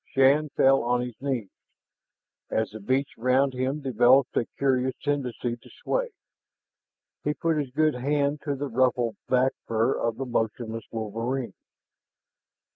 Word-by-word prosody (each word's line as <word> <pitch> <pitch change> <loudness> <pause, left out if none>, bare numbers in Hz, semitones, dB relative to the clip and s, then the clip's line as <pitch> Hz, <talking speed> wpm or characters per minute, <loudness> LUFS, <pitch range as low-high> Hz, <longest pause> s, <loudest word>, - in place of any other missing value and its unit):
Shann 140 +3 +4
fell 135 0 +5
on 120 +1 +1
his 125 0 -4
knees, 130 -8 -2 1.0
as 110 0 0
the 110 - -8
beach 130 +6 0
around 130 +3 +3
him 130 +4 -2
developed 130 0 +4
a 115 - +1
curious 130 -1 +1
tendency 125 -4 -2
to - - -18
sway. - - 0 1.1
He 150 0 0
put 165 -1 0
his 140 -3 -2
good 155 +3 +2
hand 140 +3 0
to 145 -2 -1
the 145 +1 -3
ruffled 120 -3 +1
back 130 +1 +3 0.2
fur 115 +3 +2
of 115 -1 -1
the 135 - -3
motionless 115 -1 -2
wolverine. 115 +1 -3
130 Hz, 140 wpm, -26 LUFS, 120-140 Hz, 1.1 s, fell